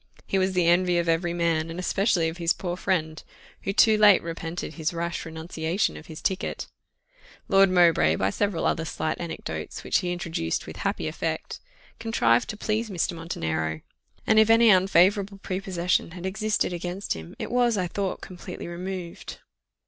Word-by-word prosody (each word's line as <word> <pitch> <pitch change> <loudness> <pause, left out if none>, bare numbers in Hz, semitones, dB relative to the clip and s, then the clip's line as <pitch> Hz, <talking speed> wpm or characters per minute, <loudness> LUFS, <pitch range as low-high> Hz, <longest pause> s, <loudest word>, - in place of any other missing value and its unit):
He 195 - 0
was 190 0 +1
the 180 -2 +2
envy 175 +1 +3
of 170 0 0
every 165 +1 +1
man, 165 -2 0
and 165 +2 -6
especially 185 -2 +1
of 160 +1 -5
his 170 -1 +2
poor 175 -2 -4
friend, 160 -4 -1 0.4
who - - -2
too 215 +1 +5
late 205 -2 +7
repented 165 0 -5
his 165 +2 -2
rash 170 0 -3
renunciation 160 +3 -2
of 160 - -11
his 155 -2 -10
ticket. 190 -1 -2 0.8
Lord 195 0 +5
Mowbray, 170 - +4
by 95 +3 0
several 200 - -1
other 165 - +1
slight 160 0 -3
anecdotes, 170 -1 -6
which - - +2
he 180 -3 -2
introduced 165 - -2
with - - -9
happy - - -2
effect, - - -4 0.4
contrived 120 - +2
to 215 - -5
please 220 +1 -1
Mr. 180 -2 -1
Montenero; 80 - -3 0.4
and 220 - +5
if 220 0 +5
any 225 0 +7
unfavourable 195 +2 +3
prepossession 185 -3 -1
had 180 0 -7
existed 210 -1 0
against 180 +3 -3
him, 80 0 -9
it - - -5
was, 240 -2 +2
I 185 - 0
thought, 190 +2 -3
completely 180 0 -8
removed. 180 0 -6
175 Hz, 170 wpm, -26 LUFS, 165-195 Hz, 0.8 s, late